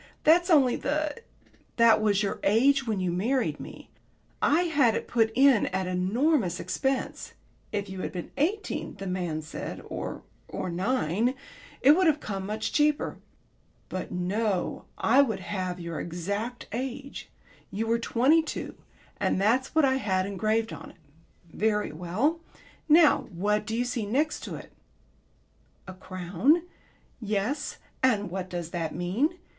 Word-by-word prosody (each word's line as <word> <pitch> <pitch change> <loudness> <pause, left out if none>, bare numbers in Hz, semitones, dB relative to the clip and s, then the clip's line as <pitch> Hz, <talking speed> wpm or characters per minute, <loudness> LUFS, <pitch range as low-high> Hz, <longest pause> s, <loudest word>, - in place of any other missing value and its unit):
That's 345 +4 +5
only 275 -7 +5
the 300 +1 -1 0.3
" - - -33
"That 230 -2 +6
was 210 -1 +2
your 200 - -2
age 265 +6 +3
when 215 -3 0
you 180 -1 0
married 235 +9 0
me. - - -10 0.5
I 305 +4 +4
had 285 -10 +3
it - - -3
put 225 -2 +2
in 265 -3 +5
at 190 0 -1
enormous 190 - +1
expense. 265 -1 -2 0.4
If 205 -1 -2
you 190 -1 -6
had - - -3
been 180 -2 -6
eighteen, 385 +9 -1
the 195 0 -7
man 175 -4 -2
said, 155 - -6
or - - -5 0.2
or 185 - -4
nine, 220 - 0 0.5
it 275 - +8
would 360 +3 +4
have 305 -1 +3
come 195 -5 -5
much 215 +1 -3
cheaper. 300 0 +1 0.7
But 185 - -5
no, 185 +2 -1
I 260 +5 +5
would 220 -8 -1
have 185 -2 -3
your 170 -1 -5
exact 200 +8 -4
age. 265 +3 -5 0.4
You 215 +3 -2
were 230 +1 +1
twenty 260 +8 +3
two 320 - -5 0.5
and - - +1
that's 240 +9 +1
what 315 -2 +5
I 265 0 +2
had 190 -7 0
engraved 215 +3 0
on - - -9
it. - - -18 0.6
Very 210 -3 0
well. 185 - -1 0.5
Now 305 -2 +6
what 210 +4 0
do 225 - -2
you 245 - +1
see 240 -4 -2
next 290 +8 0
to - - -5
it?" - - -10 1.2
"A 185 - -7
crown." 185 - +1 0.6
"Yes. 215 +5 -2 0.2
And 210 -7 +2
what 185 0 -4
does 175 -2 -5
that 165 -4 -3
mean? 205 - 0
220 Hz, 150 wpm, -27 LUFS, 185-270 Hz, 1.2 s, it